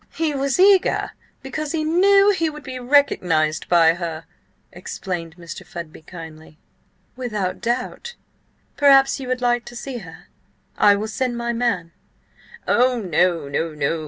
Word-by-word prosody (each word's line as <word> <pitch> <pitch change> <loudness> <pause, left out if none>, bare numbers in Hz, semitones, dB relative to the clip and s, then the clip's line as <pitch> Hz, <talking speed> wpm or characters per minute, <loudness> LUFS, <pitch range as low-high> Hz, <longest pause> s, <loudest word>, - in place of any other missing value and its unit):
"He 320 -2 0
was 275 +2 -1
eager 385 0 +4 0.3
because 295 +3 -4
he 315 -1 -1
knew 395 +5 +4
he 330 -5 0
would 300 -1 -10
be 260 -1 -7
recognised 180 - +1
by 165 -2 +5
her," 165 -2 -6 0.5
explained 175 -2 -6
Mr. 170 +2 -9
Fudby 170 -2 -9
kindly. 160 -2 -12 0.6
"Without 210 -7 -3
doubt. 250 - -3 0.6
Perhaps 275 -2 +5
you 265 - -7
would 255 0 -2
like 240 0 +1
to 240 - -11
see 250 0 -6
her? 165 -6 -13 0.5
I 205 -1 +5
will 210 +2 -3
send 245 +2 -2
my 235 0 -2
man—" 230 -8 -1 0.8
"Oh 250 0 +3
no, 175 -5 +1
no!" 160 +4 -2
235 Hz, 140 wpm, -21 LUFS, 170-275 Hz, 0.8 s, by